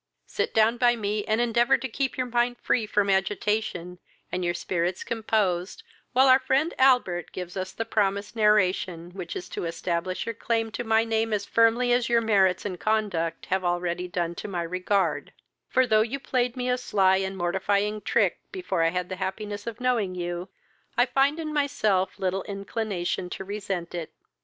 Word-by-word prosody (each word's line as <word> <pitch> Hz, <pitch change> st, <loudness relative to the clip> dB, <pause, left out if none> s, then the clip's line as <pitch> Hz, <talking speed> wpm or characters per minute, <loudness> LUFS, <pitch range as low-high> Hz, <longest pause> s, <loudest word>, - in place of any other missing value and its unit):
Sit -, -, -2 dB
down 225 Hz, +2 st, +4 dB
by 240 Hz, 0 st, +4 dB
me, 210 Hz, -1 st, -2 dB
and 220 Hz, +1 st, +1 dB
endeavour 240 Hz, +2 st, +3 dB
to 265 Hz, -, -4 dB
keep 265 Hz, +2 st, -2 dB
your 255 Hz, -, 0 dB
mind 240 Hz, 0 st, 0 dB
free 225 Hz, -3 st, 0 dB
from 205 Hz, -1 st, +1 dB
agitation, 195 Hz, -2 st, -1 dB, 0.3 s
and 180 Hz, -, -2 dB
your 175 Hz, 0 st, 0 dB
spirits 175 Hz, +1 st, -2 dB
composed, 210 Hz, -5 st, -1 dB, 0.3 s
while 260 Hz, +1 st, +5 dB
our 260 Hz, 0 st, +7 dB
friend 280 Hz, +6 st, +1 dB
Albert 250 Hz, -10 st, +3 dB
gives 180 Hz, 0 st, -7 dB
us 185 Hz, 0 st, -3 dB
the 225 Hz, -, -4 dB
promised 200 Hz, -1 st, 0 dB
narration, 185 Hz, -5 st, +2 dB
which 180 Hz, -2 st, -7 dB
is -, -, -5 dB
to -, -, -4 dB
establish 170 Hz, +2 st, -2 dB
your 230 Hz, -, -3 dB
claim 225 Hz, 0 st, -1 dB
to 240 Hz, -, -4 dB
my 225 Hz, -1 st, +3 dB
name 225 Hz, 0 st, 0 dB
as 205 Hz, -1 st, -1 dB
firmly 230 Hz, +2 st, +3 dB
as 245 Hz, -1 st, +1 dB
your 235 Hz, 0 st, +4 dB
merits 195 Hz, -5 st, +2 dB
and 185 Hz, -4 st, -4 dB
conduct 195 Hz, -7 st, -1 dB
have 190 Hz, +1 st, -1 dB
already 175 Hz, 0 st, -1 dB
done 170 Hz, -1 st, -2 dB
to 175 Hz, -, -7 dB
my 180 Hz, -4 st, -2 dB
regard; 185 Hz, +3 st, -1 dB, 0.4 s
for, 260 Hz, -, +3 dB
though 215 Hz, -3 st, +4 dB
you 235 Hz, +5 st, -2 dB
played 250 Hz, -2 st, -1 dB
me 250 Hz, 0 st, -2 dB
a 250 Hz, 0 st, +1 dB
sly 190 Hz, -6 st, +3 dB
and 190 Hz, 0 st, -3 dB
mortifying 200 Hz, +4 st, 0 dB
trick -, -, +1 dB
before 365 Hz, -, -2 dB
I 165 Hz, -, +4 dB
had 180 Hz, +1 st, -2 dB
the 185 Hz, -, -5 dB
happiness 205 Hz, +2 st, -4 dB
of 230 Hz, 0 st, -5 dB
knowing 235 Hz, -7 st, 0 dB
you, 175 Hz, +1 st, -4 dB, 0.5 s
I 245 Hz, -, +5 dB
find 275 Hz, +4 st, +2 dB
in 310 Hz, -1 st, -4 dB
myself 215 Hz, -10 st, +1 dB
little 190 Hz, 0 st, -1 dB
inclination 200 Hz, -3 st, -3 dB
to 190 Hz, -, -6 dB
resent 195 Hz, -4 st, -4 dB
it. 170 Hz, -3 st, -5 dB
205 Hz, 185 wpm, -26 LUFS, 180-235 Hz, 0.5 s, our